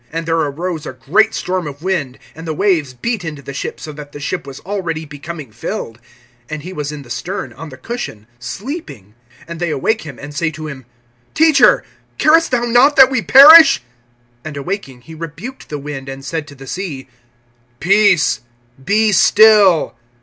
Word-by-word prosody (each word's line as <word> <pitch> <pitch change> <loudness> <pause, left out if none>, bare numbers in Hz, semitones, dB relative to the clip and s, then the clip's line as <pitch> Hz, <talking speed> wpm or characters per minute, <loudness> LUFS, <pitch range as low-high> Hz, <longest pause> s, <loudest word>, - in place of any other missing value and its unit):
(37)And 165 +1 -4
there 165 0 0
arose 160 +1 -3
a - - -6
great 150 - +1
storm 180 -3 -3
of 145 +2 -9
wind, 155 -9 -2 0.2
and 165 +2 -10
the 160 - -3
waves 170 -7 +1
beat 210 - -4
into 150 -4 -7
the 140 - -8
ship, 135 - -5
so 155 - -8
that 145 -1 -11
the 145 - -8
ship 140 - -4
was 135 -1 -9
already 175 -5 -4
becoming 145 -2 -9
filled. 115 +1 -6 0.5
(38)And 155 -1 -5
he 180 +5 -8
was 150 -3 -4
in 150 -2 -8
the 120 - -17
stern, 170 - -5
on 155 +6 -10
the 130 - -12
cushion, 130 - -7
sleeping. 125 - -8 0.3
And 170 -1 -8
they 175 -1 -1
awake 215 +10 -1
him, 140 -5 -10
and 145 +1 -9
say 155 +2 -1
to 155 0 -8
him: 135 -4 -9 0.5
Teacher, 315 -2 +5 0.3
carest 325 +2 +4
thou 245 -2 0
not 245 +5 +4
that 265 0 +7
we 255 -4 0
perish? 275 - +8 0.6
(39)And 155 -2 -7
awaking, 140 -5 -5
he 160 +6 -13
rebuked 165 - -9
the 150 - -4
wind, 140 -2 -7
and 135 0 -8
said 160 0 -4
to 145 - -13
the 135 0 -12
sea: 145 -4 -6 0.7
Peace, 195 -4 +3 0.4
be 215 +7 +2
still. 210 -4 +5
160 Hz, 185 wpm, -17 LUFS, 140-205 Hz, 0.7 s, perish